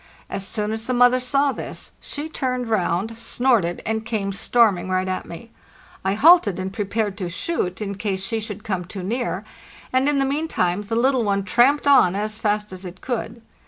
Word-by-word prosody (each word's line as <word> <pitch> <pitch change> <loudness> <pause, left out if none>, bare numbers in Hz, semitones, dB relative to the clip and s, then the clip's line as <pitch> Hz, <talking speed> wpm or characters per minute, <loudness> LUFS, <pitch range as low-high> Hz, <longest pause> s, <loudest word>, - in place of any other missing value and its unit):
As 195 0 -3
soon 210 +1 -2
as 225 +1 -4
the 255 - 0
mother 245 +1 +5
saw 275 +3 +2
this, - - -6
she 295 +1 -5
turned 255 -6 -2
round, 200 +2 0
snorted, 230 -9 +1
and 220 0 -1
came 210 -3 -2
storming 200 -2 +2
right 185 0 0
at 185 0 -3
me. 225 +7 -10 0.5
I 190 +1 +1
halted, 280 - +6
and 190 +1 -4
prepared 205 0 -1
to 180 -3 -3
shoot 185 - -2
in 200 -1 -3
case 195 -1 -3
she 225 +2 -1
should 210 -1 -6
come 185 -4 -2
too 185 +1 -7
near, 240 +6 -2 0.5
and 260 +2 +3
in 290 - +1
the 275 - +2
meantime 270 - 0
the 215 +2 -4
little 255 +1 +2
one 200 -2 0
tramped 245 +9 +3
on 270 -10 +5
as 215 +1 -3
fast 210 -1 -1
as 185 +1 -8
it 185 0 -9
could. 235 -2 -4
215 Hz, 195 wpm, -22 LUFS, 190-250 Hz, 0.5 s, halted